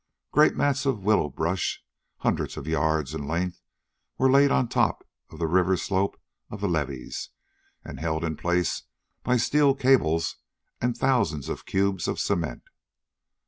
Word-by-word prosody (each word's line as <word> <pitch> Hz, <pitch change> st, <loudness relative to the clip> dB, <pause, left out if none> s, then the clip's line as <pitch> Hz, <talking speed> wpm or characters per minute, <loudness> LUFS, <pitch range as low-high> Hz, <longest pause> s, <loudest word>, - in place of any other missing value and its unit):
Great -, -, +5 dB
mats 140 Hz, 0 st, +1 dB
of 115 Hz, -8 st, 0 dB
willow 105 Hz, -7 st, +3 dB
brush, 85 Hz, +5 st, -2 dB, 0.4 s
hundreds -, -, -1 dB
of -, -, -6 dB
yards 80 Hz, -2 st, 0 dB
in 75 Hz, -3 st, -5 dB
length, 85 Hz, +3 st, -2 dB, 0.6 s
were 130 Hz, 0 st, +4 dB
laid 140 Hz, +1 st, +6 dB
on 130 Hz, -2 st, +2 dB
top -, -, 0 dB, 0.2 s
of -, -, -12 dB
the 85 Hz, -, -1 dB
river 90 Hz, +3 st, +3 dB
slope 95 Hz, +2 st, -1 dB, 0.3 s
of 105 Hz, -, -7 dB
the 100 Hz, -, -1 dB
levees 70 Hz, -7 st, -3 dB, 0.6 s
and -, -, -8 dB
held 80 Hz, 0 st, -1 dB
in 80 Hz, -2 st, -1 dB
place 90 Hz, +2 st, 0 dB, 0.4 s
by 125 Hz, 0 st, +2 dB
steel 140 Hz, +3 st, +3 dB
cables 85 Hz, -13 st, +2 dB, 0.4 s
and 120 Hz, 0 st, 0 dB
thousands 115 Hz, -, +1 dB
of -, -, -6 dB
cubes 95 Hz, -2 st, 0 dB
of -, -, -2 dB
cement. 85 Hz, -5 st, -1 dB
90 Hz, 150 wpm, -26 LUFS, 80-120 Hz, 0.6 s, laid